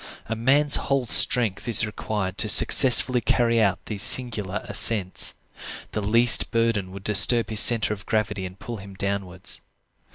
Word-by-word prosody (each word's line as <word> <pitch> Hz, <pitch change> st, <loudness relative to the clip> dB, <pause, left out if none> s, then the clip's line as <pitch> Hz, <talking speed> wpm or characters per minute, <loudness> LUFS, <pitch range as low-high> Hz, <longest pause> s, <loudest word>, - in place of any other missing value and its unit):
A 115 Hz, -, -7 dB
man's 140 Hz, +6 st, 0 dB
whole 135 Hz, -2 st, -4 dB
strength 115 Hz, -3 st, +2 dB
is 110 Hz, -2 st, +2 dB
required 105 Hz, -3 st, -7 dB
to 110 Hz, -, -2 dB
successfully 125 Hz, +1 st, +3 dB
carry 115 Hz, -2 st, -2 dB
out 100 Hz, -3 st, -2 dB
these 105 Hz, -3 st, -5 dB
singular 105 Hz, -4 st, +2 dB
ascents. 100 Hz, -5 st, 0 dB, 0.6 s
The 105 Hz, -, -6 dB
least 115 Hz, +4 st, +2 dB
burden 115 Hz, -5 st, -4 dB
would 95 Hz, 0 st, -13 dB
disturb 115 Hz, +3 st, +2 dB
his 110 Hz, -, 0 dB
centre 110 Hz, -3 st, +3 dB
of 100 Hz, 0 st, -14 dB
gravity 105 Hz, -3 st, -5 dB
and 90 Hz, +1 st, -17 dB
pull 120 Hz, +2 st, -11 dB
him 100 Hz, -1 st, -15 dB
downwards. 95 Hz, -2 st, -8 dB
110 Hz, 155 wpm, -20 LUFS, 100-120 Hz, 0.6 s, successfully